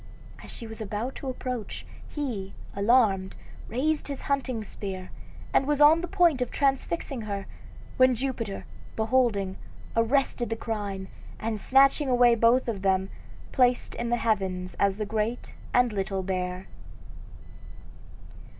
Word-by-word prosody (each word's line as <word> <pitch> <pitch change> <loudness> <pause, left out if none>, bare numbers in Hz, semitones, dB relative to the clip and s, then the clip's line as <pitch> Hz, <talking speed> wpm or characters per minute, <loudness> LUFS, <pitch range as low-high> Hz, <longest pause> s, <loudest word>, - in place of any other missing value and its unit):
As - - -11
she 230 - -8
was 220 0 -8
about 215 +5 -3
to 270 - -5
approach, 250 -3 -5 0.2
he, 230 -10 -4 0.2
alarmed, 200 -3 +3 0.3
raised 295 +7 0
his 280 -2 -5
hunting 260 -5 -1
spear, 190 -2 -6 0.4
and 270 - +3
was 295 -1 +1
on 305 +3 +7
the 350 - -3
point 335 -6 +3
of 250 - 0
transfixing 275 -1 -1
her, 200 -2 -4 0.5
when 255 -1 +5
Jupiter, 235 -5 -3 0.3
beholding, 220 -5 +1 0.4
arrested 240 +1 +1
the 225 - -1
crime, 205 -4 -4 0.3
and 220 -2 -3
snatching 275 +2 +4
away 245 -1 +6
both 235 +3 +4
of 215 -5 -2
them, 190 0 +1 0.4
placed 250 -1 +2
them - - -5
in 235 - -2
the 240 - +2
heavens 190 -5 -1
as 200 -1 +3
the 215 - -2
Great 220 +3 -2 0.2
and 245 -2 +3
Little 195 -1 -2
Bear. 180 0 -3
230 Hz, 140 wpm, -27 LUFS, 200-260 Hz, 0.5 s, on